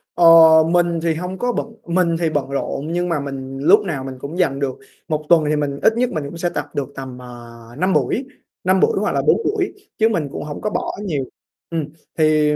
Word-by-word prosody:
Ờ, 175 Hz, -, +3 dB, 0.5 s
mình 175 Hz, -1 st, +2 dB
thì 165 Hz, -1 st, +2 dB
hông 180 Hz, +3 st, -5 dB
có 245 Hz, +6 st, 0 dB
bận -, -, -2 dB, 0.2 s
mình 170 Hz, -1 st, +1 dB
thì 165 Hz, -, +1 dB
bận 145 Hz, -3 st, -2 dB
rộn 140 Hz, +1 st, -3 dB
nhưng 175 Hz, +1 st, -1 dB
mà 165 Hz, -4 st, 0 dB
mình 135 Hz, -1 st, -6 dB
lúc 175 Hz, +9 st, +5 dB
nào 145 Hz, -8 st, -3 dB
mình 130 Hz, 0 st, -6 dB
cũng 145 Hz, +6 st, -7 dB
dành 140 Hz, -7 st, +1 dB
được 135 Hz, -2 st, -3 dB, 0.3 s
1 155 Hz, -1 st, -2 dB
tuần 170 Hz, -2 st, +6 dB
thì 150 Hz, -, +2 dB
mình 145 Hz, -1 st, -2 dB
ít 220 Hz, -, +4 dB
nhất 250 Hz, 0 st, +2 dB
mình 155 Hz, -, -3 dB
cũng 155 Hz, +4 st, -7 dB
sẽ 175 Hz, +1 st, -1 dB
tập -, -, -3 dB
được 140 Hz, -2 st, -2 dB
tầm, 130 Hz, -2 st, -7 dB
ờ, 120 Hz, -1 st, -11 dB, 0.3 s
5 185 Hz, +4 st, +1 dB
buổi, 260 Hz, -, 0 dB, 0.4 s
5 185 Hz, +1 st, +3 dB
buổi 455 Hz, -, +2 dB
hoặc -, -, 0 dB
là -, -, +2 dB
4 -, -, +5 dB
buổi, 400 Hz, -2 st, -1 dB, 0.2 s
chứ 225 Hz, -1 st, +3 dB
mình 165 Hz, -10 st, -1 dB
cũng -, -, -5 dB
hổng 150 Hz, -1 st, -7 dB
có 210 Hz, -, -1 dB
bỏ -, -, -3 dB
nhiều 160 Hz, -10 st, -2 dB, 0.5 s
ừm. 165 Hz, -3 st, -2 dB, 0.3 s
Thì 155 Hz, -1 st, +3 dB
160 Hz, 235 wpm, -20 LUFS, 140-180 Hz, 0.5 s, tuần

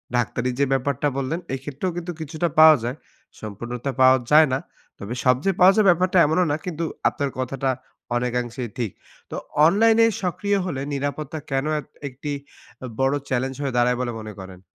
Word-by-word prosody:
ডাক্তারি 120 Hz, +1 st, 0 dB
যে 140 Hz, -, +4 dB
ব্যাপারটা 135 Hz, +1 st, 0 dB
বললেন 140 Hz, +5 st, -2 dB
এই 135 Hz, -, -2 dB
ক্ষেত্রেও 145 Hz, +6 st, -3 dB
কিন্তু 175 Hz, 0 st, -4 dB
কিছুটা 160 Hz, +2 st, -2 dB
পাওয়া 155 Hz, 0 st, +9 dB
যায়। 125 Hz, +4 st, -3 dB, 0.4 s
সম্পূর্ণতা 120 Hz, +5 st, -5 dB
পাওয়া 130 Hz, 0 st, +7 dB
যায় 155 Hz, +1 st, +7 dB
না। 130 Hz, -, +1 dB, 0.4 s
তবে 100 Hz, +4 st, -5 dB
সব 125 Hz, 0 st, +5 dB
যে 195 Hz, -, +4 dB
পাওয়া 185 Hz, +1 st, +7 dB
যায়, 215 Hz, -2 st, +4 dB
ব্যাপারটা 180 Hz, +1 st, +3 dB
এমনও 160 Hz, +4 st, +2 dB
না। -, -, +1 dB
কিন্তু 165 Hz, -2 st, -3 dB, 0.2 s
আপনার 140 Hz, -1 st, -3 dB
কথাটা 135 Hz, +1 st, -2 dB, 0.5 s
অনেকাংশেই 125 Hz, 0 st, -2 dB
ঠিক। 115 Hz, -6 st, -2 dB, 0.4 s
তো -, -, -4 dB, 0.3 s
অনলাইনে 225 Hz, +6 st, +5 dB, 0.2 s
সক্রিয় 200 Hz, +3 st, 0 dB
হলে 140 Hz, -7 st, -3 dB
নিরাপত্তা 145 Hz, +2 st, -3 dB
কেন 135 Hz, +1 st, 0 dB
এত -, -, -10 dB, 0.2 s
একটি 140 Hz, +2 st, -6 dB, 0.5 s
আ -, -, -4 dB
বড় 135 Hz, +1 st, +2 dB, 0.2 s
চ্যালেঞ্জ 130 Hz, +1 st, -1 dB
হয়ে 135 Hz, -3 st, -2 dB
দাঁড়ায় 120 Hz, 0 st, +3 dB
বলে 125 Hz, -1 st, -2 dB
মনে 110 Hz, -1 st, -8 dB
করেন? 95 Hz, -1 st, -10 dB
135 Hz, 175 wpm, -23 LUFS, 125-160 Hz, 0.5 s, পাওয়া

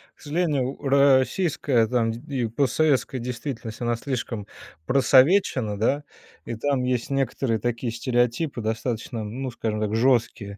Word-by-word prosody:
К -, -, -25 dB
сожалению 150 Hz, -4 st, 0 dB
у -, -, -18 dB
российская 140 Hz, -1 st, +3 dB
там 115 Hz, -1 st, +1 dB
д 115 Hz, -, -6 dB, 0.2 s
и 120 Hz, -3 st, 0 dB
постсоветской 135 Hz, +3 st, +1 dB
действительность- 120 Hz, -1 st, -6 dB
она 120 Hz, 0 st, 0 dB
слишком 115 Hz, -4 st, -4 dB, 0.4 s
просовечена, 130 Hz, -, +3 dB
да, 135 Hz, +7 st, +1 dB, 0.4 s
и 115 Hz, -, -4 dB
там 135 Hz, +2 st, 0 dB
есть 125 Hz, 0 st, -1 dB
некоторые 135 Hz, -4 st, 0 dB
такие 120 Hz, 0 st, -2 dB
стереотипы 120 Hz, +3 st, 0 dB
достаточно, 115 Hz, +1 st, -3 dB
ну, 125 Hz, +5 st, -5 dB
скажем 110 Hz, -2 st, -3 dB
так, 105 Hz, -1 st, -1 dB
жёсткие: 115 Hz, -4 st, +1 dB
125 Hz, 135 wpm, -24 LUFS, 115-135 Hz, 0.4 s, российская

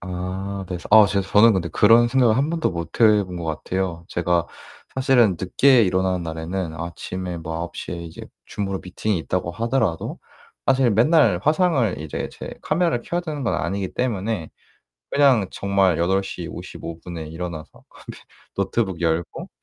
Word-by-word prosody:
아 95 Hz, +2 st, -5 dB
네 90 Hz, -, -3 dB
서 -, -, -10 dB
어 105 Hz, -1 st, +8 dB
제 100 Hz, 0 st, 0 dB
저는 105 Hz, +4 st, +5 dB
근데 90 Hz, -4 st, -1 dB
그런 115 Hz, +7 st, +5 dB
생각을 120 Hz, -3 st, +3 dB
1 140 Hz, +4 st, +1 dB
번도 165 Hz, -, 0 dB
못 85 Hz, +3 st, -6 dB
해 105 Hz, -3 st, +5 dB
본 90 Hz, -1 st, -8 dB
것 85 Hz, -, -5 dB
같아요. 85 Hz, +2 st, -3 dB
제가 85 Hz, -1 st, 0 dB, 0.5 s
사실은 125 Hz, -7 st, +3 dB
늦게 125 Hz, +6 st, +4 dB
일어나는 95 Hz, -1 st, +1 dB
날에는 80 Hz, +1 st, -4 dB
아침에 85 Hz, +2 st, -5 dB
뭐 80 Hz, 0 st, -6 dB
9:00 85 Hz, +1 st, -5 dB
에 85 Hz, -1 st, -6 dB
이제 80 Hz, -, -10 dB, 0.2 s
줌으로 100 Hz, -2 st, -3 dB
미팅이 95 Hz, +1 st, -2 dB
있다고 85 Hz, +1 st, -2 dB
하더라도 115 Hz, -4 st, -1 dB, 0.5 s
사실 130 Hz, -3 st, +3 dB
맨날 115 Hz, -, +4 dB
화상을 150 Hz, -, +2 dB
이제 75 Hz, -1 st, -4 dB
제 -, -, -8 dB
카메라를 165 Hz, -6 st, 0 dB
켜야 175 Hz, +1 st, -2 dB
되는 155 Hz, -5 st, -5 dB
건 115 Hz, -, 0 dB
아니기 95 Hz, +2 st, -2 dB
때문에 110 Hz, -7 st, -2 dB, 0.6 s
그냥 135 Hz, -8 st, +4 dB
정말 100 Hz, -4 st, +1 dB
8:55 85 Hz, -2 st, -4 dB
에 80 Hz, -, -6 dB
일어나서 80 Hz, -1 st, -6 dB
어 -, -, -22 dB
네 -, -, -38 dB, 0.7 s
노트북 95 Hz, -2 st, -1 dB
열고 80 Hz, 0 st, -2 dB
95 Hz, 300 characters per minute, -22 LUFS, 85-115 Hz, 0.7 s, 어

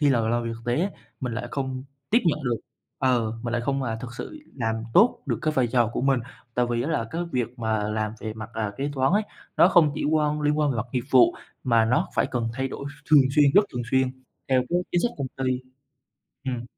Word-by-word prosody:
khi 145 Hz, -, +4 dB
là 120 Hz, -3 st, +3 dB
làm 120 Hz, +1 st, +1 dB
việc 115 Hz, -, -2 dB
thực 115 Hz, -, -12 dB
tế 120 Hz, +5 st, +1 dB
ấy, 195 Hz, +3 st, 0 dB, 0.3 s
mình 125 Hz, -3 st, -3 dB
lại 120 Hz, -, -4 dB
không 130 Hz, -2 st, -3 dB, 0.3 s
tiếp 230 Hz, -, +6 dB
nhận 155 Hz, -2 st, +2 dB
được 120 Hz, -2 st, +1 dB, 0.4 s
ừ, 120 Hz, -4 st, +2 dB
mình 120 Hz, -1 st, -3 dB
lại 120 Hz, -, +1 dB
không, 135 Hz, +2 st, 0 dB
à, 115 Hz, -3 st, -2 dB
thực 120 Hz, -1 st, -7 dB
sự 310 Hz, -, -7 dB, 0.2 s
làm 110 Hz, -3 st, 0 dB, 0.2 s
tốt 225 Hz, +6 st, +5 dB
được -, -, -1 dB
cái 155 Hz, -1 st, +1 dB
vai 130 Hz, -4 st, +2 dB
trò 120 Hz, 0 st, +2 dB
của -, -, -2 dB
mình. 135 Hz, -1 st, +2 dB, 0.3 s
Tại 125 Hz, 0 st, +2 dB
vì 120 Hz, 0 st, 0 dB
á 145 Hz, -, -2 dB
là 145 Hz, -8 st, 0 dB
cái 170 Hz, -, -2 dB
việc 125 Hz, -1 st, -2 dB
mà 110 Hz, -2 st, 0 dB
làm 110 Hz, 0 st, -1 dB
về 110 Hz, -, -4 dB
mặt, 110 Hz, -1 st, -8 dB
à, 110 Hz, -2 st, -2 dB
kế 140 Hz, +2 st, -2 dB
toán 135 Hz, +3 st, +2 dB
ấy, 210 Hz, +2 st, +3 dB, 0.3 s
nó -, -, +7 dB
không 160 Hz, -6 st, +5 dB
chỉ -, -, -3 dB
quan 150 Hz, 0 st, +1 dB
liên 150 Hz, 0 st, +1 dB
quan 150 Hz, -2 st, +2 dB
về 125 Hz, -, -1 dB
mặt 110 Hz, +1 st, -2 dB
nghiệp 125 Hz, -2 st, -1 dB
vụ 345 Hz, 0 st, +6 dB, 0.3 s
mà 115 Hz, -3 st, +4 dB
nó 120 Hz, +3 st, +1 dB
phải -, -, +2 dB
cần 120 Hz, -3 st, -1 dB
thay 135 Hz, +1 st, -1 dB
đổi 140 Hz, -, -7 dB
ph 145 Hz, +1 st, -12 dB
thường 150 Hz, -2 st, +9 dB, 0.2 s
xuyên, 150 Hz, -, +7 dB
rất 205 Hz, -, +7 dB
thường 125 Hz, -2 st, -2 dB
xuyên 130 Hz, -1 st, +3 dB, 0.4 s
theo 130 Hz, -1 st, +3 dB
cái 175 Hz, -, +2 dB
chính 175 Hz, -, +3 dB
sách 240 Hz, -, +1 dB
công 135 Hz, -2 st, -2 dB, 0.2 s
ty. 130 Hz, 0 st, 0 dB, 0.8 s
Ừm. 125 Hz, -3 st, -3 dB
130 Hz, 255 wpm, -25 LUFS, 120-150 Hz, 0.8 s, thường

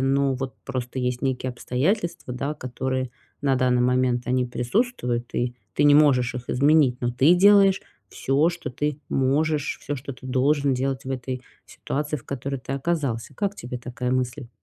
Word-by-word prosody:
но 135 Hz, 0 st, +2 dB
вот 130 Hz, 0 st, -4 dB
просто 130 Hz, -1 st, -4 dB
есть 125 Hz, 0 st, -1 dB
некие 130 Hz, -1 st, -1 dB
обстоятельства, 165 Hz, -, -1 dB
да, 140 Hz, +4 st, -2 dB
которые 130 Hz, -1 st, -3 dB, 0.3 s
на 135 Hz, -2 st, +3 dB
данный 125 Hz, -1 st, +2 dB
момент 125 Hz, -1 st, +2 dB
они 125 Hz, 0 st, +1 dB
присутствуют, 125 Hz, -, -1 dB
и 120 Hz, 0 st, -1 dB, 0.2 s
ты -, -, +2 dB
не 145 Hz, 0 st, +7 dB
можешь 130 Hz, -5 st, +4 dB
их 125 Hz, 0 st, -6 dB
изменить, 140 Hz, -2 st, +3 dB
но 120 Hz, 0 st, 0 dB
ты 140 Hz, +8 st, +5 dB
делаешь 195 Hz, 0 st, +6 dB, 0.3 s
всё, 140 Hz, +5 st, +1 dB
что 170 Hz, -5 st, -5 dB
ты 145 Hz, +3 st, -2 dB
можешь, 145 Hz, +3 st, +1 dB
всё, 145 Hz, -, -3 dB
что 140 Hz, +1 st, -6 dB
ты 130 Hz, +1 st, -12 dB
должен 140 Hz, +2 st, +2 dB
делать 135 Hz, +1 st, -2 dB
в 135 Hz, -, -5 dB
этой 130 Hz, 0 st, -4 dB, 0.2 s
ситуации, 150 Hz, +2 st, -3 dB
в 120 Hz, -, -13 dB
которой 140 Hz, 0 st, -4 dB
ты 135 Hz, -, -6 dB
оказался. 140 Hz, -5 st, -2 dB
Как 200 Hz, -1 st, -1 dB
тебе 125 Hz, -5 st, -6 dB
такая 125 Hz, +1 st, -4 dB
мысль? 125 Hz, -1 st, -2 dB
130 Hz, 170 wpm, -24 LUFS, 125-145 Hz, 0.3 s, не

